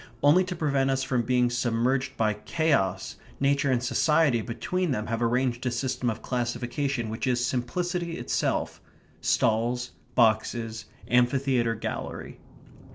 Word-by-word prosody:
Only 155 +6 +6
to 185 0 -4
prevent 140 -4 +1
us 135 0 +1
from 130 -2 0
being 125 +1 +2
submerged 120 +2 0
by 110 -1 +2
chaos, 105 - 0 0.2
nature 140 0 +2
and 125 -1 +1
society 140 0 +3
between 180 +10 -2
them 110 -6 -1
have 115 0 -2
arranged 120 +1 +1
a - - +1
system 125 0 -1
of 110 - -5
classification 120 +1 -2
which 110 - -3
is 125 -1 +1
simplicity 170 +8 -2
itself; - - -1 0.4
stalls, 120 +3 +1 0.2
boxes, 115 0 +1 0.2
amphitheatre, 125 -1 +2
gallery. - - -5
125 Hz, 130 wpm, -27 LUFS, 120-140 Hz, 0.4 s, Only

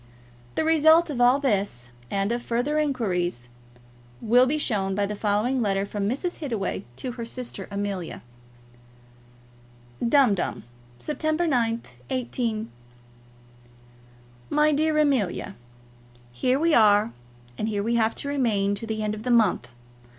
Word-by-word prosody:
The - - +1
result 320 +1 +5
of 245 -4 -2
all 245 +2 +6
this, 200 - -1 0.2
and 200 +2 -1
of 240 0 -1
further 245 +6 -1
inquiries, 180 - -1 0.7
will 245 +3 +4
be 300 +4 0
shown 200 -9 0
by 205 0 +1
the 210 +1 -4
following 215 +5 0
letter 195 -2 0
from 200 0 -2
Mrs. 345 +9 -3
Hittaway 230 - -3
to 250 - -4
her 240 -1 -6
sister 230 -4 -5
Amelia: 195 - -4 1.8
Dumdum, 235 -6 +2 0.4
9th - - -19
September, 300 -7 0 0.3
18. 235 -3 -2 1.8
MY 300 +1 +3
DEAR 310 +1 +1
AMELIA, 245 - 0 0.8
Here 250 - +1
we 330 +1 +2
are, 205 - +5 0.5
and 215 - -1
here 205 -2 -1
we 230 +2 0
have 225 -1 +2
to - - -6
remain 225 -8 +1
to 205 +3 -5
the 220 -1 -3
end 210 0 -1
of 215 - -6
the 250 - -4
month. 215 - +3
230 Hz, 135 wpm, -25 LUFS, 200-275 Hz, 1.8 s, all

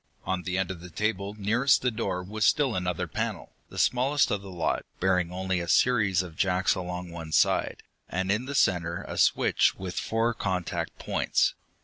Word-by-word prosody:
On 95 -1 -1
the 90 +1 -2
end 95 -1 0
of 90 -3 -8
the 90 - -9
table 100 +2 -2
nearest 115 +8 +3
the 125 - +2
door 90 -4 -2
was 105 +3 -3
still 135 +3 +3
another 90 -2 -1
panel, - - -4 0.2
the - - -11
smallest 135 +4 +2
of 105 - 0
the 100 - -10
lot, 85 -3 -1 0.2
bearing 90 -2 +1
only 95 0 -1
a 85 - -4
series 100 -2 +3
of 85 -3 -10
jacks 90 +1 +2
along 90 -1 -5
one 80 -2 -7
side, - - +2 0.3
and 95 +1 -1
in 110 +5 0
the 140 +1 -5
center 85 -6 +1
a - - -5
switch - - +3
with 95 -1 -4
four 115 +1 0
contact 95 -5 -3
points. - - +1
95 Hz, 190 wpm, -27 LUFS, 90-110 Hz, 0.3 s, nearest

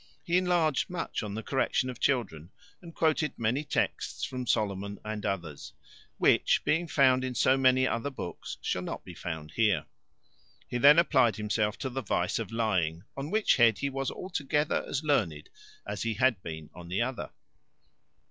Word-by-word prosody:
He 170 - 0
enlarged 175 -6 +2
much 180 -2 -3
on 105 -2 -5
the 110 - -5
correction 135 0 0
of 125 -2 -6
children, 95 - -1 0.3
and 170 -2 -10
quoted 155 -2 +1
many 120 +6 0
texts - - -2
from 130 -2 -4
Solomon, 100 -1 -1
and 105 -1 -4
others; 85 -7 -5 0.4
which - - +3
being 170 +2 +1
to - - -11
be - - -8
found 130 -2 +5
in 130 -1 -3
so 130 +4 +4
many 130 -1 +4
other 125 +2 -1
books, 130 -10 -7
shall - - -1
not - - -6
be - - -9
found 80 -3 -6
here. 105 -5 +2 0.8
He 120 - -3
then 145 +4 +8
applied 130 -9 +4
himself 105 0 -1
to 130 - -3
the 135 +2 -3
vice 90 -4 -1
of 115 -2 -5
lying, 95 -8 0
on 140 +2 -5
which 215 +2 +3
head 115 -3 +5
he 140 - -2
was 135 0 -2
altogether 150 -4 -1
as 140 - -2
learned 95 - 0 0.4
as 105 0 -4
he 115 -1 -1
had 125 -6 +2
been 80 -3 -8
on 85 0 -11
the 95 +6 0
other. 130 +1 -4
120 Hz, 180 wpm, -29 LUFS, 100-140 Hz, 0.8 s, then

